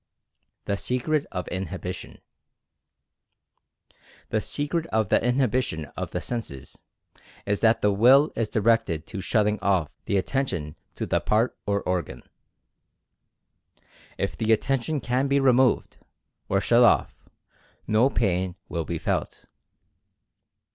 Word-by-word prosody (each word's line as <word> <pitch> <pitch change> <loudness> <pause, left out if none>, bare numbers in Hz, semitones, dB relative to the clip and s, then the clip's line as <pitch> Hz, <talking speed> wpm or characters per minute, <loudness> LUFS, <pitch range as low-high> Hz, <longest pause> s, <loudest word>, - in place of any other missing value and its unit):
THE 100 - -1
SECRET 140 +7 -1
OF 90 -1 -4
INHIBITION. 95 -1 -5 2.1
The 110 - 0
secret 155 +6 -2
of 110 - 0
the - - +3
inhibition 125 - 0
of - - -4
the - - -3
senses, 110 - -6 0.7
is 100 0 0
that 115 0 +3
the 105 - +4
Will 130 +8 +5
is 110 -2 -1
directed 110 -8 +1
to 100 - -6
"shutting 105 +1 +1
off" 95 -7 +1
the 100 - +1
attention 95 - -2 0.2
to - - -3
the - - +1
part 110 +4 +1
or 100 0 0
organ. 90 -9 -3 1.9
If - - -2
the 110 0 0
Attention 135 +5 0
can 125 +3 0
be 140 0 +2
removed, 130 -1 +3 0.5
or 100 - +2
shut 120 +3 +4
off, 120 - +4 0.7
no 110 +5 +3
pain 95 -7 0
will 85 -2 -3
be 85 +2 -3
felt. - - -3
110 Hz, 120 wpm, -25 LUFS, 95-125 Hz, 2.1 s, Will